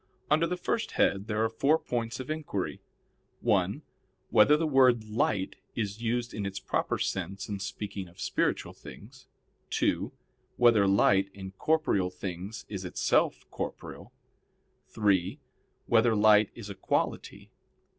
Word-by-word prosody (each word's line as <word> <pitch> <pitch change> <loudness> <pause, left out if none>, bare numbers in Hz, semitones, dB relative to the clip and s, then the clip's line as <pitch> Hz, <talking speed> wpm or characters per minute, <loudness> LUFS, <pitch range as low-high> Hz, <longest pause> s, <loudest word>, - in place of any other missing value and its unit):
Under 160 +2 +4
the 180 +1 -2
first 225 - -2
head 100 +1 +1
there 110 0 0
are - - +3
four 140 +7 +2
points 115 -5 -3
of 130 +3 -5
inquiry: 145 - -4 0.6
(1) - - +1 0.5
Whether 145 +8 +6
the 165 - 0
word 130 -6 +4
light 105 -3 -1 0.2
is 105 -1 -3
used 120 +1 -1
in 105 - -4
its 100 0 -4
proper 95 - -1
sense 95 0 -3
in 100 -2 -4
speaking 100 0 -5
of 85 - -19
spiritual - - -1
things? 130 +5 -13 0.4
(2) - - 0 0.5
Whether 115 -5 +5
light, 100 0 +3
in 95 -1 -8
corporeal 100 -5 +1
things, 95 +3 -7
is 95 -3 -6
itself 90 - +1
corporeal? - - -7 0.8
(3) 100 - +1 0.5
Whether 115 0 +3
light 105 0 +5
is 115 -4 -8
a 100 - -6
quality? 95 - -3
105 Hz, 135 wpm, -29 LUFS, 100-120 Hz, 0.8 s, Whether